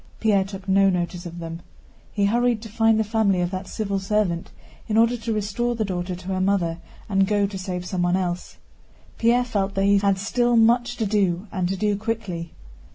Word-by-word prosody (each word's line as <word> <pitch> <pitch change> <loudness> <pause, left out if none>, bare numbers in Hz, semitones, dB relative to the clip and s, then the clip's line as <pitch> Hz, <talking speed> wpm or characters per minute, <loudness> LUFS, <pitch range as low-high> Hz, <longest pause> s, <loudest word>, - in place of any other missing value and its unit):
Pierre 205 -3 +3
took 195 0 -9
no 195 0 +4
notice 175 -1 -2
of 170 0 -9
them. 165 0 -6 0.5
He 200 -1 +1
hurried 240 +2 +2
to 220 - -8
find 225 0 +3
the - - +3
family 210 -3 +1
of 175 0 -1
that 185 0 -5
civil 200 -2 -2
servant 190 -4 0 0.4
in 220 -1 0
order 230 +2 +4
to 230 0 -4
restore 215 +3 -1
the 220 -2 -1
daughter 180 -1 -3
to 180 +1 -11
her 185 -1 -1
mother 180 -4 +1 0.3
and 195 -2 +2
go 205 0 +2
to 200 -1 -5
save 180 -1 -4
someone 180 -1 0
else. 180 -1 -3 0.6
Pierre 240 +2 +3
felt 200 -4 -1
that 195 - +1
he 200 0 +5
had 195 -1 +2
still 240 +4 +1
much 240 +2 +3
to 225 - 0
do 195 -3 +1
and 185 -3 -1
to 195 - -2
do 210 +1 +1
quickly. 200 -6 -4
200 Hz, 205 wpm, -23 LUFS, 185-220 Hz, 0.6 s, he